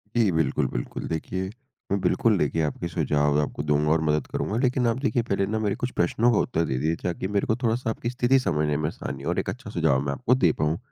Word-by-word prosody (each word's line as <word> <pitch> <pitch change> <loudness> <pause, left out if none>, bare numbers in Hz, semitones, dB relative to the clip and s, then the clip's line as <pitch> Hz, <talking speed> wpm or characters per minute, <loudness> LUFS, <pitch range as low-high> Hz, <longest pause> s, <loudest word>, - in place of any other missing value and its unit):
जी 110 -5 +3
बिल्कुल, 80 -4 +1
बिल्कुल। - - -4
देखिए, 95 +4 -3 0.4
मैं 100 - +2
बिल्कुल 105 +3 +2
देखिए, 80 +1 0
आपके 80 +3 -2
सुझाव 75 -2 +1
आपको 75 0 -3
दूँगा 75 +1 +2
और 80 0 +3
मदद 75 0 +1
करूँगा। 105 - -2
लेकिन 125 -1 +2
आप 115 - +1
देखिए, 135 -3 +1
पहले 100 -3 0
न 110 +2 -2
मेरे 105 -2 0
कुछ 125 - -3
प्रश्नों 115 +7 +2
का 105 - +2
उत्तर 85 -9 0
दे 65 - -2
दीजिए, 80 +5 0
ताकि 90 +1 -2
मेरे 100 0 0
को 110 - +2
थोड़ा-सा 115 +1 0
आपकी 115 +1 -3
स्थिति 125 +2 +3
समझने 75 - 0
में 75 0 -1
आसानी 70 -4 -6
हो - - -2
और - - 0
एक - - -2
अच्छा - - -6
सुझाव 65 0 +2
मैं 70 - 0
आपको 125 - +2
दे 90 -11 +4
पाऊँ। 75 +2 +1
90 Hz, 240 wpm, -25 LUFS, 75-115 Hz, 0.4 s, दे